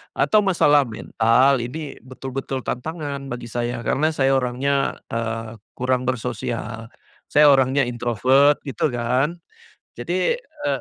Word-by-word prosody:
atau 215 - +3
masalah 150 -7 +4
mental, 115 +4 +2
ini 145 +4 -6
betul-betul 130 +1 -5
tantangan 140 0 -4
bagi 120 -1 -6
saya, 120 +1 -3
karena 155 +6 +1
saya 135 -2 +2
orangnya, 135 +2 0 0.2
eee, 115 0 -3 0.2
kurang 125 0 0
bersosial, 115 -2 -3 0.4
saya 150 0 +6
orangnya 135 0 +3
introvert 125 +4 +3
gitu 135 - 0
kan. 125 +8 0 0.6
Jadi, 180 - 0
e 310 -11 -10
130 Hz, 115 wpm, -22 LUFS, 120-145 Hz, 0.6 s, saya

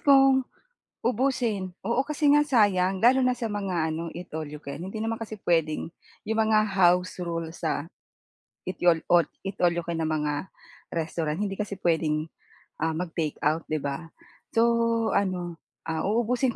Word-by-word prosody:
kong 270 -2 +5 0.5
ubusin, 235 -6 0 0.2
oo, 245 +3 +2
kasi 300 0 0
nga 295 0 +6
sayang 195 -8 +3
lalo 255 +3 +5
na 250 - +4
sa 245 -2 -2
mga 195 -6 -1
ano, 165 +1 -4
eat 180 +1 -8
all 155 -2 -4
you 150 - -7
can, 140 +4 -7
hindi 195 +4 -5
naman 225 +1 -1
kasi 215 -2 -6
puwedeng 165 -3 +1 0.4
'yung 220 0 0
mga 215 -1 +3
house 180 -1 +2
rule 165 -1 -3
sa, 160 -1 -2 0.8
eat 185 - -2
youl 170 -2 +5
all 175 -1 +6 0.2
eat 195 - -4
all 175 - +6
you 170 - -1
can 165 -1 -2
na 160 - 0
mga 150 +2 -2 0.4
restaurant, 160 0 -2
hindi 200 -2 -1
kasi 200 -2 -4
puwedeng, 160 -2 +1 0.5
ah, 160 0 0
mag-takeout, 160 -2 -1
'di 155 -1 -1
ba? 140 +4 -3 0.5
So 225 - +5 0.5
ano, 180 -4 -1 0.2
ah, 160 +2 -2
uubusin 240 +3 +1
180 Hz, 165 wpm, -27 LUFS, 160-220 Hz, 0.8 s, nga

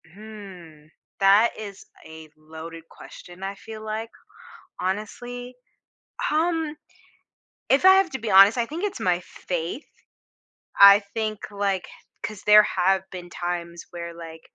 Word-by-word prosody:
Hmm, 190 -7 -12 0.3
that 200 +4 +5
is 205 -3 -9 0.2
a 160 0 -12
loaded 160 +2 -10
question, 175 +2 -13
I 195 +1 -4
feel 220 +2 -10
like. 220 +1 -4 0.7
Honestly, 245 +6 -5 0.8
um, 320 -1 0 0.9
if 275 +6 +3
I 380 0 +9
have 385 -2 +3
to 265 - -4
be 225 -2 -4
honest, 195 +3 +7
I 235 - +1
think 325 - -5
it's 405 -1 -3
my 180 -1 +1
faith. 175 - -5 0.9
I 200 0 +9
think, 215 -2 -2
like 200 -3 -2 0.3
'cause 210 -2 -6
there 210 0 +8
have 190 0 0
been 175 -1 -9
times, 170 -1 -5
where, 170 -1 -7
like, 165 -1 -10
200 Hz, 130 wpm, -24 LUFS, 175-225 Hz, 0.9 s, I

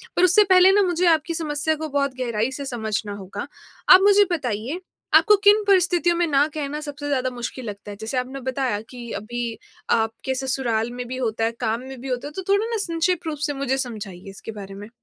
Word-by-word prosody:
पर 355 - +3
उससे 370 +4 +7
पहले 370 +1 +7
ना, 410 +1 +4
मुझे 355 0 +1
आपकी 325 0 +2
समस्या 315 -1 -1
को 315 +1 -5
बहुत 280 -1 0
गहराई 235 -1 -1
से 280 +1 -6
समझना 220 -4 -3
होगा। 200 +4 -7 0.4
आप 370 +1 +10
मुझे 405 0 +6
बताइए, 255 - -2 0.3
आपको 420 -1 +7
किन 415 +1 +6
परिस्थितियों 355 -2 +3
में 345 0 +2
ना 285 0 +3
कहना 300 0 -3
सबसे 290 -1 -6
ज़्यादा 260 -2 0
मुश्किल 245 0 -6
लगता 205 0 -7
है? 200 - -9
जैसे 225 +4 -3
आपने 260 +2 -3
बताया 260 -4 -1
कि 240 -2 -9
अभी 235 +1 -4 0.3
आपके 225 +3 0
ससुराल 245 -3 -1
में 245 0 -6
भी 255 +1 -5
होता 225 -3 -1
है, 225 - +2
काम 230 0 -1
में 265 -2 -8
भी 270 - -7
होता 250 +3 -3
है, - - -8
तो 380 - -5
थोड़ा 410 +2 +2
ना 460 -1 -2
संक्षिप्त 335 0 -1
रूप 300 -2 -3
से 290 - -2
मुझे 270 -1 -1
समझाइए 205 -7 -6
इसके 195 +3 -9
बारे 195 0 -9
में। 205 +2 -9
265 Hz, 215 wpm, -23 LUFS, 230-330 Hz, 0.4 s, आप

